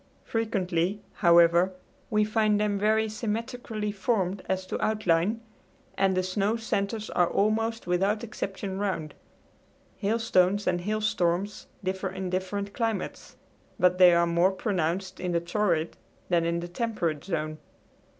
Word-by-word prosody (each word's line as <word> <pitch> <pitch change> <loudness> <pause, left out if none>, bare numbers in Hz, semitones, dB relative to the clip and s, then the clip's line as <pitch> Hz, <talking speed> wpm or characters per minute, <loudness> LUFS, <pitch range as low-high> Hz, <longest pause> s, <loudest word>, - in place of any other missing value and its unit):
Frequently, 195 -4 -1
however, 170 +1 +5 0.4
we 215 0 +3
find 215 -1 +2
them 205 -1 0
very 220 +1 +2
symmetrically 220 0 -3
formed 200 -2 -1
as 190 0 -1
to - - -3
outline, 210 0 +1 0.5
and 190 -1 +2
the 185 - +2
snow 195 +4 0
centers 215 -1 -2
are 175 -1 +2
almost 225 +2 0
without 195 +5 +1
exception 195 -3 -4
round. 185 -7 -2 0.8
Hailstones 205 -2 +2
and 175 -1 +1
hailstorms 205 -2 -1 0.2
differ 190 +1 -2
in 190 -1 -5
different 200 +2 -3
climates, 225 -4 -3 0.4
but 180 0 +3
they 180 -1 +9
are 170 0 +4
more 170 +2 +3
pronounced 185 -1 -2
in 180 -1 -2
the 170 - +3
torrid 170 -2 0 0.3
than 170 -2 +2
in 170 0 0
the 175 - -5
temperate 175 -6 -2
zone. 155 -4 -3
195 Hz, 130 wpm, -27 LUFS, 175-215 Hz, 0.8 s, they